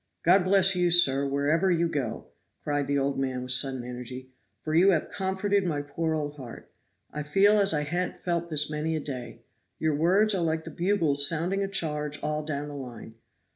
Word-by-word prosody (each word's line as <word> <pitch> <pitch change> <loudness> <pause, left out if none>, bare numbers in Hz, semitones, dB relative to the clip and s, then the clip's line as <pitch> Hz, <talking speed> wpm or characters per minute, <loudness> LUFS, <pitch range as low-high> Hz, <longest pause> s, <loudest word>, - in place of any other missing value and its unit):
"God 180 +2 +5
bless 190 0 +4
you, 180 -1 +2
sir, 140 -5 +4
wherever 145 +7 +1
you 170 -1 +2
go!" 130 -8 -4 0.4
cried 145 -1 -1
the 140 - 0
old 140 0 -1
man 130 -2 -2
with 125 - 0
sudden 130 0 0
energy, 125 +1 -8 0.3
"for 155 - -3
you 175 +5 +5
have 170 -5 +1
comforted 195 +1 -1
my 150 -5 -2
poor 160 +3 -2
old 150 -1 -4
heart. 125 -4 -11 0.4
I 150 - -4
feel 195 +8 +3
as 200 0 +3
I 150 -1 0
han't 175 +4 -3
felt 170 -1 -2
this 150 -2 +1
many 155 +1 -3
a - - -1
day. 130 -4 -7 0.3
Your 155 -1 0
words 190 +8 +3
are 190 - -1
like 160 -1 -1
the 165 - -9
bugles 160 -5 +3
sounding 175 +5 -1
a - - -2
charge 150 -6 -1
all 150 0 -1
down 150 -1 -4
the 145 - -8
line. 120 -5 -9
155 Hz, 200 wpm, -27 LUFS, 140-175 Hz, 0.4 s, God